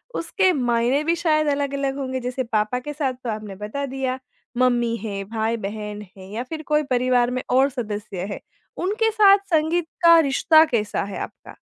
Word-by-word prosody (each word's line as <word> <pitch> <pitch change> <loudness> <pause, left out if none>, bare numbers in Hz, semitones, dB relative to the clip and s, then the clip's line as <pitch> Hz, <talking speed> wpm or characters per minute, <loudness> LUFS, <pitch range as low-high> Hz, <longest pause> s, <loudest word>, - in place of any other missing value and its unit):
उसके 385 -4 +1
मायने 245 +1 +1
भी 335 +2 +1
शायद 310 -1 +3
अलग-अलग 280 -1 -2
होंगे। 260 -2 -3
जैसे 250 +1 -3
पापा 220 +1 -1
के 295 +4 -7
साथ 275 -3 -1
तो 235 - -3
आपने 215 -2 -5
बता 210 +8 -4
दिया, 260 -1 -3 0.4
मम्मी 240 -2 +2
हैं, 200 -2 -4
भाई-बहन 215 -2 -3 0.2
हैं 190 0 -11
या 235 +3 -3
फिर 315 -1 -5
कोई 300 - +4
परिवार 250 0 +2
में - - -3
और 265 +2 +4
सदस्य 210 -6 -5
है, - - -7 0.5
उनके 445 +3 +1
साथ 410 -2 +6 0.2
संगीत 320 +2 +2 0.2
का 335 0 +8
रिश्ता 315 +3 +5
कैसा 210 -2 -1
है - - -5
आपका? - - -15
255 Hz, 175 wpm, -22 LUFS, 220-300 Hz, 0.5 s, का